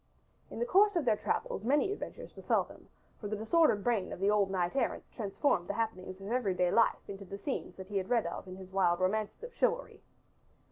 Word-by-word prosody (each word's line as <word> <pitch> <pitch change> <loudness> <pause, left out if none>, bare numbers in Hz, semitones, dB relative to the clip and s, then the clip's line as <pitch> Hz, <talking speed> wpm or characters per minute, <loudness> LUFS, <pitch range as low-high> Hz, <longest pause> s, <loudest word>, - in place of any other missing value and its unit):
In - - -8
the 235 - 0
course 405 +9 +4
of 335 -5 +1
their 225 -3 +4
travels 200 - -2
many 290 - +2
adventures - - -7
befell - - +1
them, - - -16 0.3
for 210 - -5
the 215 - -2
disordered 220 0 +3
brain 225 -6 0
of - - -6
the 200 +2 +3
old 205 -2 +3
knight 180 0 -1
errant 275 - 0
transformed 200 - 0
the 200 - -3
happenings 190 -4 -3
of 195 +3 -7
every 230 -7 +1
day 180 -1 +2
life 230 -1 +3
into 200 0 -7
the 195 +1 -7
scenes 270 +7 -4
that 190 - -8
he 205 - -1
had 190 0 -2
read 235 -3 +2
of - - -5
in 185 - -7
his 190 0 -11
wild 185 -3 +2
romances 210 - -1
of 480 0 -7
chivalry. - - 0
210 Hz, 225 wpm, -32 LUFS, 190-250 Hz, 0.3 s, course